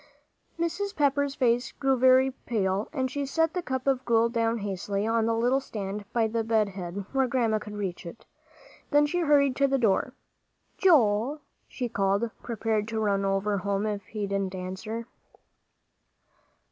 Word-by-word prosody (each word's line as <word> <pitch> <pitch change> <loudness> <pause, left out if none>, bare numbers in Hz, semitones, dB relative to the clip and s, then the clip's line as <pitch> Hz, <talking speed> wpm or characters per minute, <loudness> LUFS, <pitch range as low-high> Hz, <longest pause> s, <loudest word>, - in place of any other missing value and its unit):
Mrs. 370 +5 -2
Pepper's 285 -1 +1
face 245 0 +1
grew 270 -1 +1
very 260 +1 +5 0.2
pale, 200 -2 0
and 260 -4 -2
she 285 +1 -2
set 325 +4 0
the 360 - -1
cup 260 -5 -3
of 265 -2 +1
gruel 230 -1 +3
down 230 0 0
hastily 200 0 -3
on 225 0 +1
the 230 - +1
little 245 +4 +2
stand 205 -5 -6
by 230 -2 +2
the 225 +1 -1
bed 220 -2 +2
head, 190 0 -6
where 270 -1 +2
Grandma 235 -4 +1
could 210 0 -9
reach 195 -4 -4
it. 170 - -11 0.6
Then 295 0 +4
she 355 +4 -1
hurried 285 -5 +3
to 280 - +4
the 270 0 +1
door. 220 -6 +1 0.7
"Joel!" 275 - +3 0.3
she 250 - -4
called, 200 +1 0
prepared 220 -2 -1
to 225 -1 -3
run 200 -2 +1
over 195 +1 0
home 200 +1 -1
if 205 -2 -3
he 210 -2 -4
didn't 195 -1 -2
answer. 190 +5 -5
230 Hz, 165 wpm, -27 LUFS, 205-265 Hz, 0.7 s, very